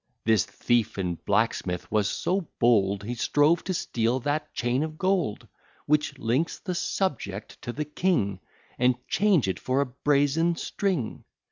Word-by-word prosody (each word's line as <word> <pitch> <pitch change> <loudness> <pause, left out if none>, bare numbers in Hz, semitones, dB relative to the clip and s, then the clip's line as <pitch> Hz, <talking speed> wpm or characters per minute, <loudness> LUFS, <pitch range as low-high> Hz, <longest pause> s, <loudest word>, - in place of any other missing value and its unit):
This 110 -4 +4
thief 120 -4 0
and 90 -3 -3
blacksmith 90 -1 0
was 105 -1 +2
so 185 -2 -1
bold, 100 -4 +3
He 115 +4 -3
strove 145 +7 +2
to 185 - -1
steal 120 -3 0
that 150 +3 -2
chain 120 +3 0
of 155 0 -4
gold, 185 - 0 0.4
Which 150 -1 +1
links 135 +6 0
the 185 - -4
subject 140 - -3
to 120 - -4
the 150 +5 -3
king, 150 - 0 0.4
And 125 0 +4
change 195 - +3
it 95 - -2
for 130 +1 0
a 140 - +3
brazen 145 +5 +1
string. 175 - -2
135 Hz, 150 wpm, -26 LUFS, 110-160 Hz, 0.4 s, This